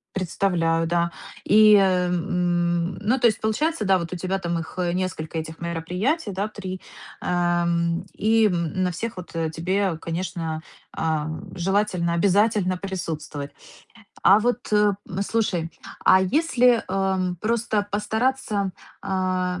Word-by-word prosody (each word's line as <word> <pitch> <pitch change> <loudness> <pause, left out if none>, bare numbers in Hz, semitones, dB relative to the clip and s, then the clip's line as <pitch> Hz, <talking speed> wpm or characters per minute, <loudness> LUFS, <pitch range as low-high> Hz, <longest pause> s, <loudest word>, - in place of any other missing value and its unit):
Представляю, 170 -3 +1
да. 170 0 +1 0.3
И, 215 0 +7
м, 175 -2 +1
ну, 230 +6 +1
то 240 - +2
есть 220 - 0
получается, 225 +6 0
да, 190 -1 +4
вот, 170 -1 -5
у - - -2
тебя 185 +2 -2
там 170 -2 -2
их 160 - -8 0.2
несколько 170 -3 -3
этих 160 +1 -7
мероприятий, 180 - -2
да, 195 +2 -2
3, 190 -3 -6 0.4
а, 175 -1 +1 0.5
и 220 +1 +3
на 180 +1 -1
всех 215 +5 -5
вот 180 - -8
тебе, 165 +3 -1
конечно, 165 -1 -4 0.3
э, - - -5 0.5
желательно, 185 -2 0
обязательно 200 +1 +2
присутствовать. 160 -6 -5 0.7
А 200 +2 +7
вот 245 0 +1 0.7
слушай, 185 -7 -1 0.3
а 190 - +7
если, 250 - +3
а, 190 0 0 0.2
просто 215 -2 0
постараться, 220 -2 0 0.3
а, 185 -1 -1
185 Hz, 120 wpm, -24 LUFS, 170-210 Hz, 0.7 s, И